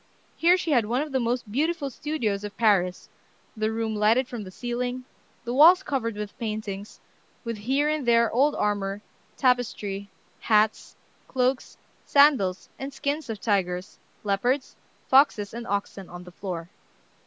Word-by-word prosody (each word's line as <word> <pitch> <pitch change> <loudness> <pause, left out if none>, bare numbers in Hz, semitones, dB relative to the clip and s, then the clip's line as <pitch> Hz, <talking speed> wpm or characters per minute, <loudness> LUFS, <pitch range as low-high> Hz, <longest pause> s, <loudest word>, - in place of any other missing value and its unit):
Here 350 +2 +4
she 340 -3 -2
had 240 -6 +3
one 245 +5 0
of 305 - -8
the 265 - +1
most 240 -2 -2
beautiful 295 +3 -1
studios 235 -9 -2
of 205 -1 -7
Paris, 190 -5 +2 0.5
the 215 0 -1
room 220 -1 -2
lighted 220 +5 +3
from 240 -4 -6
the 190 - -9
ceiling, 245 +4 -4 0.4
the 240 0 -4
walls 340 +8 +7
covered 230 - -2
with 210 0 -6
paintings, 215 -2 -5 0.4
with 230 -2 -3
here 265 +8 0
and 305 -4 -1
there 235 -1 +4
old 280 +5 +3
armor, 205 0 -1 0.3
tapestry, 215 -6 0 0.3
hats, 215 -1 +1 0.3
cloaks, 255 0 -1 0.3
sandals, 270 -11 +3
and 270 +1 -5
skins 285 0 -3
of 220 -2 -4
tigers, 190 -3 -1 0.2
leopards, 245 +7 0 0.3
foxes, 260 -7 +4
and 235 0 -6
oxen 200 -1 -3
on 175 0 -9
the 180 - -12
floor. 175 -2 -6
230 Hz, 150 wpm, -26 LUFS, 205-265 Hz, 0.5 s, walls